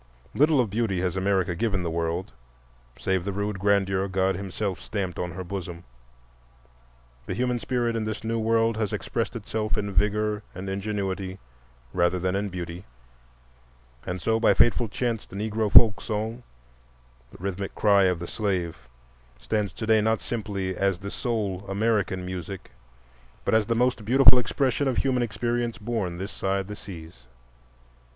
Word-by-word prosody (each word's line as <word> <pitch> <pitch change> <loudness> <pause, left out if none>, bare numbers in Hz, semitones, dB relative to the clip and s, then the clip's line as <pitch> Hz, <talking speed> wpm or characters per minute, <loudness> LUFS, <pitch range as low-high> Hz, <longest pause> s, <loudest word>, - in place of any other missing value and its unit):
Little 150 0 +4
of 115 -5 +1
beauty 105 -4 0
has 90 -1 -1
America 95 -2 +1
given 100 0 0
the 85 - -2
world 85 +4 -2 0.7
save 95 -2 0
the 100 - -2
rude 100 0 -2
grandeur 95 -1 +2
God 95 0 +1
himself 95 0 -3
stamped 95 -4 -3
on 90 - -2
her 95 +2 -5
bosom; 90 -2 -6 1.4
the - - -2
human 125 0 0
spirit 120 -1 0
in 115 - -1
this 110 0 -4
new 115 0 -1
world 115 0 +2
has 110 -3 -1
expressed - - -2
itself 110 0 -2
in 100 -1 -2
vigor 105 +2 +1
and 95 +2 -6
ingenuity 95 -1 -3 0.6
rather 85 +1 +2
than 90 +1 0
in 100 +1 -1
beauty. 90 0 -6 1.2
And 90 +1 -4
so 110 +6 +1
by 115 - +4
fateful 120 0 +4
chance 115 0 -2
the - - -11
Negro 110 0 -1
folk 105 -2 +8
song—the - - -8
rhythmic 100 +1 -4
cry 100 -2 +5
of 90 -2 +2
the 85 - -6
slave—stands 65 - -4
to - - -5
day 110 -1 +4
not 110 +1 +2
simply 100 -5 -3
as 95 -1 +1
the 100 +2 -7
sole 105 -6 -2
American 100 -2 0
music, 90 +1 -6 0.7
but - - +1
as 110 -2 +4
the 115 - +1
most 125 -1 +1
beautiful 125 +2 +7
expression 135 +3 0
of 130 - 0
human 130 -2 +2
experience 120 +1 -1
born 105 -6 -2
this 95 +3 -5
side 95 0 -1
the 105 - -6
seas. 80 -12 -11
100 Hz, 155 wpm, -26 LUFS, 90-110 Hz, 1.4 s, folk